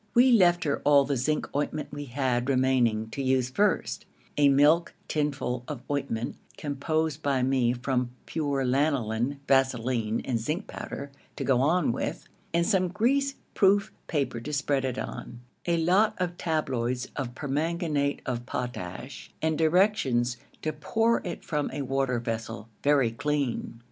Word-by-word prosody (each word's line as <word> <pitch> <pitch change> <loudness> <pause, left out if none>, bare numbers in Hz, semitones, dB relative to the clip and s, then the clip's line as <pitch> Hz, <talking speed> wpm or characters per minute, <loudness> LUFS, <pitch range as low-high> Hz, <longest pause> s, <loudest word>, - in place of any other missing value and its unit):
We 250 +2 +7
left 175 -6 +5
her 145 -2 -1
all 140 -1 +6
the 140 0 0
zinc 150 +5 0
ointment 145 +1 -1
we 145 0 -5
had 130 -1 0
remaining 125 -4 +2
to 140 - -3
use 130 -1 +1
first; 205 +8 0 0.3
a 145 -1 +5
milk 150 +5 +4
tinful 140 -5 -1
of 140 -5 -6
ointment, 120 -5 -2 0.2
composed 155 +2 -1
by 135 -3 +1
me 130 -2 +2
from 125 0 -1 0.2
pure 140 -4 -1
lanoline, 130 -1 0
vaseline, 125 -4 +2
and 120 -3 0
zinc 155 - -2
powder, 140 0 -7 0.2
to - - -3
go 130 -2 +3
on 155 +1 +3
with, - - -4 0.2
and 170 0 +2
some 190 -3 +2
grease 275 +9 +1 0.2
proof 200 +1 +3 0.2
paper 140 -7 -1
to 140 +6 -6
spread 140 -2 0
it 130 -1 -2
on, 120 0 -6 0.3
a 170 -1 +3
lot 190 +6 +3
of 180 -1 -2
tabloids 130 -8 -1
of 125 -4 -4
permanganate 150 0 -1
of 120 -2 -3
potash 125 +1 -5
and 160 0 +1
directions 155 - +2 0.3
to 155 - -1
pour 225 +10 +1
it 175 - -6
from 150 -2 -1
a 140 +1 -3
water 135 -1 0
vessel, 115 -1 -4
very 140 -5 +3
clean. 140 -2 -2
140 Hz, 150 wpm, -27 LUFS, 125-160 Hz, 0.3 s, We